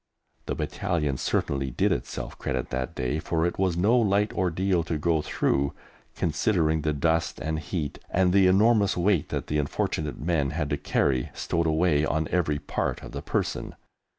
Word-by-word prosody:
The -, -, -1 dB
Battalion 80 Hz, -8 st, -1 dB
certainly 70 Hz, +1 st, -1 dB
did -, -, +1 dB
itself -, -, -3 dB
credit 65 Hz, -3 st, -3 dB
that 65 Hz, -1 st, -3 dB
day, 65 Hz, +5 st, -1 dB
for 80 Hz, 0 st, 0 dB
it 85 Hz, -, -2 dB
was 95 Hz, -3 st, +1 dB
no 105 Hz, +7 st, +4 dB
light 105 Hz, -3 st, +2 dB
ordeal 90 Hz, -1 st, +1 dB
to 80 Hz, -1 st, -2 dB
go 80 Hz, 0 st, +1 dB
through, 70 Hz, -1 st, 0 dB, 0.4 s
considering 80 Hz, -1 st, +1 dB
the 75 Hz, -, 0 dB
dust 80 Hz, +3 st, 0 dB
and 80 Hz, +3 st, -2 dB
heat, 80 Hz, -3 st, -4 dB
and 90 Hz, 0 st, +2 dB
the 95 Hz, -1 st, +6 dB
enormous 100 Hz, +1 st, +4 dB
weight 90 Hz, -2 st, +2 dB
that -, -, -3 dB
the 75 Hz, -, -1 dB
unfortunate 75 Hz, +1 st, -2 dB
men 75 Hz, -3 st, 0 dB
had 75 Hz, 0 st, -2 dB
to 75 Hz, -, +1 dB
carry 65 Hz, -3 st, 0 dB
stowed 85 Hz, -1 st, -1 dB
away 80 Hz, -1 st, +2 dB
on 80 Hz, 0 st, 0 dB
every 80 Hz, -5 st, +1 dB
part 70 Hz, -, -3 dB
of -, -, -8 dB
the -, -, -5 dB
person. -, -, -2 dB
80 Hz, 175 wpm, -26 LUFS, 75-90 Hz, 0.4 s, the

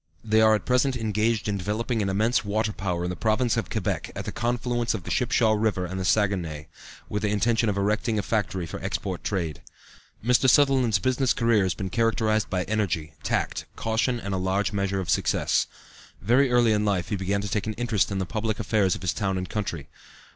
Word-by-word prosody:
They 110 Hz, 0 st, +3 dB
are 110 Hz, 0 st, +6 dB
at 105 Hz, -, -4 dB
present 125 Hz, +1 st, +2 dB
engaged 110 Hz, 0 st, 0 dB
in 100 Hz, -1 st, -1 dB
developing 110 Hz, +4 st, -1 dB
an 100 Hz, -, 0 dB
immense 110 Hz, +6 st, +1 dB
water 105 Hz, +1 st, -1 dB
power 90 Hz, -3 st, -2 dB
in 90 Hz, -, -2 dB
the -, -, -4 dB
Province 115 Hz, +3 st, +1 dB
of -, -, -2 dB
Quebec, -, -, -2 dB
at -, -, -5 dB
the -, -, -3 dB
confluence 120 Hz, 0 st, -1 dB
of 95 Hz, -, -6 dB
the -, -, -6 dB
Shipshaw 110 Hz, -, +2 dB
River 105 Hz, -4 st, +1 dB
and 95 Hz, +2 st, -5 dB
the 95 Hz, -, -2 dB
Saguenay, 90 Hz, -7 st, 0 dB, 0.4 s
with 105 Hz, -, -3 dB
the 105 Hz, -, 0 dB
intention 110 Hz, +2 st, +2 dB
of 100 Hz, -, -1 dB
erecting 105 Hz, +3 st, 0 dB
a 105 Hz, -, 0 dB
factory 95 Hz, -4 st, -1 dB
for -, -, -7 dB
export -, -, -3 dB
trade. 85 Hz, -7 st, -2 dB, 0.6 s
Mr. 125 Hz, +2 st, +4 dB
Sutherland's 130 Hz, -6 st, +4 dB
business 130 Hz, +6 st, +1 dB
career 115 Hz, -3 st, +3 dB
has 95 Hz, -3 st, 0 dB
been 95 Hz, +1 st, -5 dB
characterized 110 Hz, -1 st, +1 dB
by 90 Hz, -2 st, 0 dB
energy, 90 Hz, -7 st, -2 dB
tact, -, -, -1 dB
caution 115 Hz, +2 st, 0 dB
and 100 Hz, -3 st, -4 dB
a -, -, 0 dB
large 95 Hz, +3 st, 0 dB
measure 100 Hz, -1 st, -1 dB
of 95 Hz, -, -4 dB
success. -, -, +1 dB, 0.5 s
Very 125 Hz, +6 st, +3 dB
early 120 Hz, -2 st, +4 dB
in 105 Hz, -1 st, +2 dB
life 100 Hz, -4 st, 0 dB
he 105 Hz, -, 0 dB
began 100 Hz, +1 st, -1 dB
to 100 Hz, -, -4 dB
take 105 Hz, +1 st, -2 dB
an 110 Hz, -, -2 dB
interest 110 Hz, -3 st, 0 dB
in 100 Hz, -, -2 dB
the 95 Hz, -, -1 dB
public 110 Hz, +1 st, -2 dB
affairs 105 Hz, -4 st, +1 dB
of -, -, -9 dB
his 85 Hz, -3 st, 0 dB
town 95 Hz, +4 st, -1 dB
and 90 Hz, 0 st, -4 dB
country. 95 Hz, -9 st, -3 dB
105 Hz, 210 wpm, -25 LUFS, 95-115 Hz, 0.6 s, are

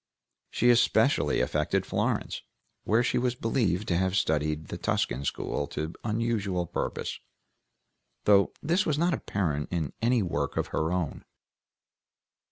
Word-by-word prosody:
She 120 Hz, +1 st, +4 dB
especially 120 Hz, -1 st, +3 dB
affected -, -, 0 dB
Florence, -, -, -1 dB, 0.4 s
where 115 Hz, +3 st, +3 dB
she 120 Hz, -, +1 dB
was 125 Hz, 0 st, 0 dB
believed 110 Hz, -5 st, 0 dB
to 85 Hz, -, +2 dB
have 95 Hz, +1 st, +1 dB
studied 75 Hz, -4 st, 0 dB
the -, -, -4 dB
Tuscan 65 Hz, +3 st, -1 dB
School 70 Hz, -, -2 dB
to 80 Hz, +3 st, -4 dB
unusual 105 Hz, -5 st, -1 dB
purpose, -, -, -3 dB, 1.0 s
though 100 Hz, -1 st, +5 dB
this 170 Hz, +5 st, +2 dB
was 150 Hz, -2 st, 0 dB
not 170 Hz, +2 st, +2 dB
apparent 80 Hz, -, -2 dB
in 80 Hz, -6 st, -2 dB
any 120 Hz, -1 st, +3 dB
work 75 Hz, -6 st, -2 dB
of -, -, -1 dB
her 80 Hz, +1 st, -1 dB
own. 90 Hz, -5 st, -2 dB
95 Hz, 135 wpm, -28 LUFS, 80-120 Hz, 1.0 s, though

